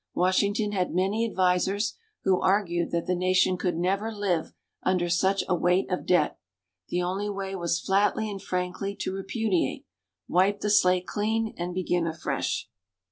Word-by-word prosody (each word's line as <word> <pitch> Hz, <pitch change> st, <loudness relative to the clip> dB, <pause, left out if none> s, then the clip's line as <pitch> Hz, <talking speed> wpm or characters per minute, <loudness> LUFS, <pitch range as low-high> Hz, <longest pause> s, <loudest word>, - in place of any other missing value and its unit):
Washington 200 Hz, +4 st, +2 dB
had 185 Hz, -4 st, -1 dB
many 205 Hz, +5 st, +1 dB
advisers 190 Hz, +2 st, +1 dB, 0.3 s
who 190 Hz, -2 st, +2 dB
argued 185 Hz, -3 st, +1 dB
that 170 Hz, -1 st, -1 dB
the 180 Hz, -, 0 dB
Nation 185 Hz, +1 st, +2 dB
could 180 Hz, -2 st, -1 dB
never 195 Hz, +5 st, 0 dB
live 195 Hz, -6 st, -1 dB, 0.3 s
under 180 Hz, -2 st, +1 dB
such 190 Hz, +3 st, +2 dB
a -, -, +1 dB
weight 180 Hz, +2 st, +1 dB
of 180 Hz, -, -2 dB
debt 175 Hz, -5 st, +2 dB, 0.5 s
the 175 Hz, 0 st, -1 dB
only 195 Hz, +3 st, -2 dB
way 195 Hz, -1 st, -4 dB
was 170 Hz, -2 st, 0 dB
flatly 205 Hz, +3 st, +1 dB
and 200 Hz, -2 st, -6 dB
frankly 185 Hz, +2 st, -3 dB
to 185 Hz, -, -3 dB
repudiate 195 Hz, -1 st, -1 dB, 0.4 s
wipe 195 Hz, +3 st, +2 dB
the 210 Hz, -, 0 dB
slate 180 Hz, -3 st, +4 dB
clean 220 Hz, +2 st, -1 dB
and 175 Hz, +1 st, -4 dB
begin 175 Hz, -2 st, 0 dB
afresh. 160 Hz, 0 st, -2 dB
185 Hz, 155 wpm, -27 LUFS, 180-200 Hz, 0.5 s, slate